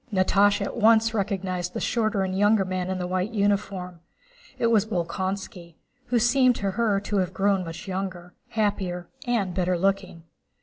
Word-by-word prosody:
Natásha 200 +1 +3
at - - -5
once 225 0 +4
recognized 185 -4 -2
the - - -1
shorter 215 -4 0
and 185 0 -2
younger 205 0 +3
man 185 0 -3
in 190 - -1
the 180 - -3
white 185 +2 -1
uniform: 200 -4 -1 0.6
it - - 0
was 215 -4 +4
Bolkónski, 180 -2 -4 0.3
who 245 - +1
seemed 250 +2 +4
to 200 -2 -2
her 210 -1 +1
to 205 0 -2
have 185 -1 -1
grown 195 0 +2
much 165 +2 -8
younger, 185 -2 -5 0.2
happier, 190 -5 -2 0.2
and 210 -7 0
better 180 0 0
looking. 190 -2 -1
195 Hz, 165 wpm, -25 LUFS, 180-210 Hz, 0.6 s, once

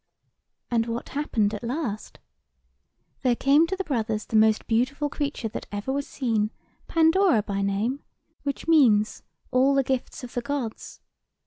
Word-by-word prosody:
"And 230 -1 +1
what 230 +1 -4
happened 225 -7 0
at 210 - -5
last? 235 -4 -4 1.0
There 250 -2 +2
came 285 +6 +4
to 380 - -2
the 385 - -3
two - - -26
brothers 220 -4 -1
the - - -4
most 220 0 +4
beautiful 255 +6 0
creature 285 -6 -2
that - - -7
ever 205 +6 -3
was 280 0 -2
seen, 225 -5 0 0.4
Pandora 325 - +4
by 200 -1 -2
name; 205 +8 -1 0.4
which 280 +1 -4
means, 225 -10 +4 0.3
All 265 +2 +4
the 275 - +3
gifts 260 0 -3
of 245 - -8
the 245 - -1
Gods. 270 -4 -5
245 Hz, 155 wpm, -25 LUFS, 220-285 Hz, 1.0 s, came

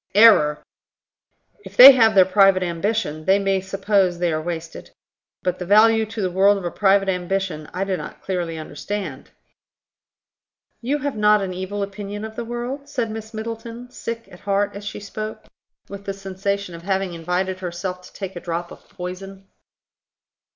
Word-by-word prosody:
"Error! 200 -9 +6 1.0
If - - -12
they 265 +3 +13
have 225 -5 +4
their 190 -2 +7
private 190 0 +4
ambition, 170 -2 -2
they 190 +1 +5
may 195 -1 0
suppose 195 -1 +1
they 175 -1 0
are 155 - -1
wasted. 165 0 -6 0.5
But 180 -1 -1
the 180 - -4
value 220 +2 +5
to 215 -1 -4
the 185 - -1
world 195 +3 +4
of 190 - -6
a 175 - -2
private 195 -1 +3
ambition, 180 -4 -2
I 185 - -2
do 195 -1 -1
not - - -9
clearly 175 -4 -3
understand." 155 0 -6 1.5
"You 265 +5 0
have 285 -2 -3
not 210 -1 +4
an 185 -1 -4
evil 190 +3 -4
opinion 205 +1 -6
of 220 0 -9
the 235 - -4
world?" 245 +4 -5
said 245 -6 -2
Miss 220 0 -7
Middleton, 230 +2 -7
sick 230 -2 -6
at 180 - -13
heart 200 0 0
as 200 - -7
she 205 - -6
spoke, 215 +1 -7 0.4
with 200 0 -9
the 195 - -4
sensation 195 0 -3
of 170 - -9
having 190 0 -1
invited 180 +3 -2
herself 180 0 -5
to 180 - -15
take 195 -2 -7
a - - -5
drop 170 0 -4
of - - -14
poison. 195 +2 -8
195 Hz, 170 wpm, -22 LUFS, 180-215 Hz, 1.5 s, they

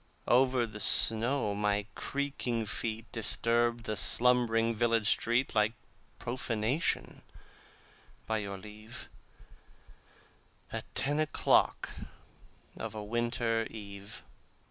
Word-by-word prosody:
Over 125 0 +3
the 105 -2 -9
snow 115 +1 +3
my 105 0 0
creaking 135 -5 -2
feet 110 +1 -3
Disturbed 120 +1 +1
the 110 - -3
slumbering 115 0 +4
village 115 -1 +1
street 120 +3 +1
Like 105 0 +2 0.4
profanation, 120 +2 -2 1.0
by 110 -1 -1
your 100 -1 -5
leave, 105 +3 -11 1.6
At - - -5
ten 145 +2 0
o'clock 155 - +2 0.8
of - - -6
a 105 - -5
winter 115 0 -1
eve. 100 -2 -10
115 Hz, 95 wpm, -31 LUFS, 105-120 Hz, 1.6 s, slumbering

